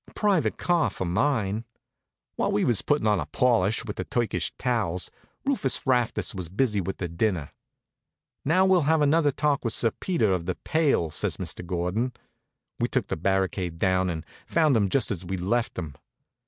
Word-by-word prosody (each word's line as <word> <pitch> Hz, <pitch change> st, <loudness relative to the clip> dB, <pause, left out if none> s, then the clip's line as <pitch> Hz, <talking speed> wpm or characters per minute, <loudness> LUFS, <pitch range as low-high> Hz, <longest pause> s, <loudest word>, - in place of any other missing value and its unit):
A -, -, -17 dB
private 185 Hz, -, +2 dB
car 175 Hz, -2 st, +2 dB
for 95 Hz, -, -4 dB
mine. 110 Hz, +2 st, 0 dB, 0.7 s
While -, -, 0 dB
we 105 Hz, -, +1 dB
was 120 Hz, -5 st, +2 dB
puttin' 145 Hz, -5 st, +1 dB
on 105 Hz, -3 st, +3 dB
a 75 Hz, -, -3 dB
polish 110 Hz, -, +2 dB
with 105 Hz, -, -6 dB
the -, -, -2 dB
Turkish 120 Hz, -2 st, -1 dB
towels, 110 Hz, -8 st, -1 dB, 0.3 s
Rufus 260 Hz, -, +1 dB
Rastus 125 Hz, -4 st, +1 dB
was 90 Hz, -4 st, -5 dB
busy 105 Hz, +1 st, +1 dB
with 95 Hz, +2 st, -4 dB
the 90 Hz, -, -3 dB
dinner. 85 Hz, -2 st, -1 dB, 0.9 s
"Now, 180 Hz, +6 st, +3 dB
we'll 180 Hz, -6 st, +3 dB
have 160 Hz, -2 st, +4 dB
another 150 Hz, +1 st, +4 dB
talk 145 Hz, 0 st, 0 dB
with 115 Hz, -2 st, 0 dB
Sir 115 Hz, -, +2 dB
Peter 165 Hz, -, 0 dB
of 90 Hz, -2 st, -2 dB
the 90 Hz, -, -1 dB
Pail," 145 Hz, -, +1 dB
says -, -, -2 dB
Mr. -, -, -5 dB
Gordon. 90 Hz, +8 st, -1 dB, 0.7 s
We -, -, +2 dB
took -, -, -1 dB
the -, -, 0 dB
barricade 95 Hz, -1 st, -1 dB
down, 95 Hz, +1 st, +2 dB
and 80 Hz, -2 st, -4 dB, 0.2 s
found 155 Hz, -5 st, +3 dB
him 100 Hz, -3 st, +2 dB
just 125 Hz, -2 st, +1 dB
as 95 Hz, -3 st, -3 dB
we'd 95 Hz, +1 st, -4 dB
left 115 Hz, +6 st, 0 dB
him. 80 Hz, -5 st, -4 dB
110 Hz, 180 wpm, -26 LUFS, 90-140 Hz, 0.9 s, have